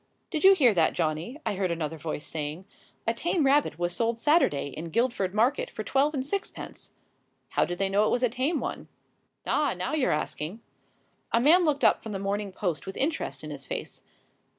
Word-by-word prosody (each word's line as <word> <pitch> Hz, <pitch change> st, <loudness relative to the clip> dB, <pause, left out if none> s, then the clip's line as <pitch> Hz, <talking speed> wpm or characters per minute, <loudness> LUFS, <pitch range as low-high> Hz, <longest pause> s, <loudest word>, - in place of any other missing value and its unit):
"Did 315 Hz, -4 st, -2 dB
you 385 Hz, +1 st, +9 dB
hear 255 Hz, -, +5 dB
that, 165 Hz, -4 st, +3 dB
Johnny?" 165 Hz, -, -2 dB
I -, -, 0 dB
heard 190 Hz, -1 st, -1 dB
another 160 Hz, -1 st, -3 dB
voice 150 Hz, 0 st, -4 dB
saying. 155 Hz, +3 st, -4 dB, 0.4 s
"A 230 Hz, -, +2 dB
tame 325 Hz, +5 st, 0 dB
rabbit 280 Hz, -, +3 dB
was 175 Hz, 0 st, -1 dB
sold 230 Hz, 0 st, 0 dB
Sat'day 230 Hz, -, +2 dB
in 165 Hz, +2 st, -6 dB
Guildford 230 Hz, -1 st, 0 dB
market 265 Hz, -, +2 dB
for -, -, -6 dB
twelve 285 Hz, +3 st, +1 dB
and 260 Hz, -1 st, -2 dB
sixpence!" 395 Hz, +7 st, -5 dB, 0.6 s
"How -, -, +2 dB
did 175 Hz, -, -4 dB
they 195 Hz, -, +1 dB
know 205 Hz, +2 st, +3 dB
it -, -, 0 dB
was 245 Hz, -, +1 dB
a -, -, +5 dB
tame 270 Hz, +7 st, 0 dB
one?" -, -, -5 dB, 0.6 s
"Ah, 295 Hz, -9 st, +1 dB
now 185 Hz, +11 st, -3 dB
you're 300 Hz, -4 st, +2 dB
asking!" 155 Hz, +7 st, -3 dB, 0.7 s
A 230 Hz, -, +4 dB
man 335 Hz, +8 st, +5 dB
looked 295 Hz, -2 st, +1 dB
up -, -, +4 dB
from 220 Hz, -2 st, -6 dB
The -, -, -2 dB
Morning 200 Hz, +1 st, -2 dB
Post 180 Hz, -4 st, -3 dB
with 190 Hz, -, -6 dB
interest 315 Hz, +4 st, -2 dB
in -, -, -6 dB
his -, -, -7 dB
face. -, -, -5 dB
225 Hz, 200 wpm, -27 LUFS, 175-290 Hz, 0.7 s, you